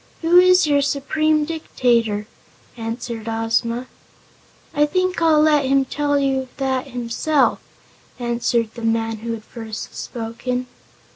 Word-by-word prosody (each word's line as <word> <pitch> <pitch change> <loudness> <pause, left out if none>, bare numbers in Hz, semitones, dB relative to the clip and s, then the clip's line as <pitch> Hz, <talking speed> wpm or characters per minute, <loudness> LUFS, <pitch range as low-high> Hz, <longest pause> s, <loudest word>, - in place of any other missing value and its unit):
"Who 345 +2 +6
is 365 0 +6
your 285 -1 +3
Supreme 305 +2 +1
Dictator?" 235 -9 0 0.5
answered 230 -1 -5
Ozma. 230 +2 -1 0.9
"I 295 0 +3
think 370 +2 0
I'll 315 -2 +5
let 300 -3 +4
him 270 0 +3
tell 290 +1 0
you 270 -2 0
that 265 -1 -1
himself," 250 +4 0 0.6
answered 235 -2 -1
the 235 - -9
man 225 0 0
who 230 +2 -4
had 220 -1 -7
first 225 -1 -8
spoken. 245 +2 -4
255 Hz, 125 wpm, -21 LUFS, 230-295 Hz, 0.9 s, Who